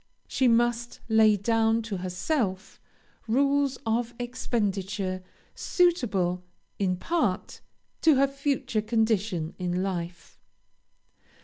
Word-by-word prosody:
She 260 - +1
must 240 0 +1
lay 220 -1 +5
down 225 +2 +2
to 215 -3 -4
herself 185 - -2 0.5
rules 275 +2 +2
of 235 +1 -1
expenditure 200 -6 -2 0.3
suitable, 205 - +1 0.4
in 185 -2 +1
part, 255 - -1 0.4
to 315 -3 +5
her 275 +1 +4
future 275 -5 -1
condition 215 -7 0
in 180 0 -1
life. 175 -2 -5
220 Hz, 95 wpm, -27 LUFS, 185-245 Hz, 0.5 s, lay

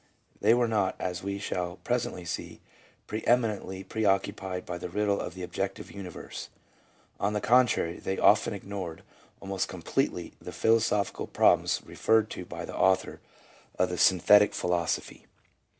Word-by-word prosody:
They 115 - +5
were 120 -1 +2
not, 105 -4 +1
as 90 -1 -3
we 100 +1 -3
shall 90 -3 -3
presently 120 -7 -2
see, - - -5 0.5
preeminently 110 -4 0
preoccupied 95 -2 -1
by 85 - -5
the 90 - -5
riddle 100 +2 0
of 85 - -6
the 95 - -6
objective 95 +2 -4
universe. 95 -4 -8 0.7
On 100 +1 0
the 105 - 0
contrary 115 -8 +3
they 95 - -3
of 105 +1 +5
ten 105 - -3
ignored 95 -4 -6 0.4
almost 95 -1 -2
completely - - -2
the - - -7
philosophical 110 -3 +1
problems - - +3
re - - -12
ferred 110 -1 +3
to 90 - -6
by - - -6
the - - -8
author 95 0 +2 0.6
of 90 - +2
the 90 - -3
Synthetic 105 +3 +5
Philosophy. 85 -1 -2
100 Hz, 150 wpm, -28 LUFS, 90-105 Hz, 0.7 s, They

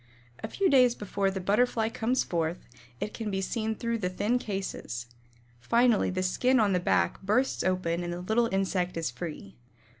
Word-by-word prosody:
A - - -1
few 390 - 0
days 250 -5 +5
before 200 -1 -1
the 190 0 -3
Butterfly 220 +4 +2
comes 235 +3 0
forth, 170 0 -2 0.3
it 210 - -4
can 225 -2 -4
be 195 -1 -1
seen 220 +3 -2
through 230 +1 -2
the 180 -3 -1
thin 210 +7 0
cases. 190 - -4 0.5
Finally 235 - +3
the 185 0 -1
skin 250 +8 +2
on 205 -3 +3
the 180 - +2
back 175 - +1
bursts 215 +7 +1
open 180 -2 0
and 175 - -3
the 175 +1 -4
little 225 +5 +1
insect 185 -2 0
is 165 -6 -1
free. 125 - -7
195 Hz, 180 wpm, -28 LUFS, 180-230 Hz, 0.5 s, days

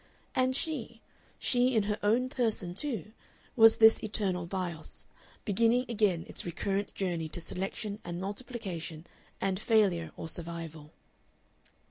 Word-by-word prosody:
And 255 0 +2
she, 270 -6 -3 0.4
she 250 0 +2
in 220 - +4
her 210 +1 -1
own 230 +5 +3
person 220 -8 -1
too, 215 - -3 0.4
was 225 -1 +8
this 220 0 +7
eternal 195 -5 -1
Bios, 175 -4 -5 0.4
beginning 230 +4 +3
again 205 -7 +1
its - - -3
recurrent 195 +3 -2
journey 170 -4 -1
to 165 - -5
selection 200 +4 -4
and 175 0 -5
multiplication 195 -6 -5 0.3
and 190 -1 0
failure 195 -8 +3
or - - -5
survival. 165 -2 -6
200 Hz, 125 wpm, -31 LUFS, 175-225 Hz, 0.4 s, was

